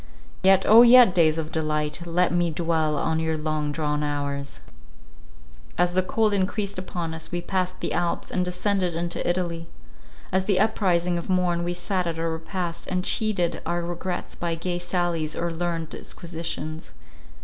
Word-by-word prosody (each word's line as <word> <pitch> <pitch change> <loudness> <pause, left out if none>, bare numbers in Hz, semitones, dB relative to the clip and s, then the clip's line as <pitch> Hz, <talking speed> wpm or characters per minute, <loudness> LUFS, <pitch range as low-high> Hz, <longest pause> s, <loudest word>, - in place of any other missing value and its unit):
Yet, 190 0 +5
O 225 +2 +9
yet, 240 -4 +8
days 160 -3 +4
of 160 -1 -3
delight! 155 +1 -2
let 175 +1 +2
me 175 -1 +2
dwell 160 -2 0
on 160 +2 0
your 160 0 -1
long 155 -1 -2
drawn 150 -1 -1
hours! 140 -2 -3 1.2
As 175 0 +2
the 185 - +3
cold 215 +3 +1
increased 200 0 -1
upon 175 -3 -4
us, 160 0 -6
we 175 - -1
passed 185 0 -2
the - - -1
Alps, 175 0 -1
and 180 - +1
descended 180 0 0
into 170 +1 -2
Italy. 170 -2 -2 0.6
At 190 +1 +1
the 200 -3 +3
uprising 180 -5 +2
of 170 - -8
morn, 180 -2 +1
we 175 +1 -2
sat 180 0 -1
at 165 -1 -3
our 165 0 -1
repast, 170 +1 -4
and 185 -1 -1
cheated 205 -6 0
our 175 +1 -1
regrets 175 +1 -4
by 170 -1 -2
gay 175 +1 -2
sallies 175 -3 -1
or 170 0 -2
learned 165 -1 -2
disquisitions. 160 - -6
175 Hz, 165 wpm, -25 LUFS, 160-185 Hz, 1.2 s, O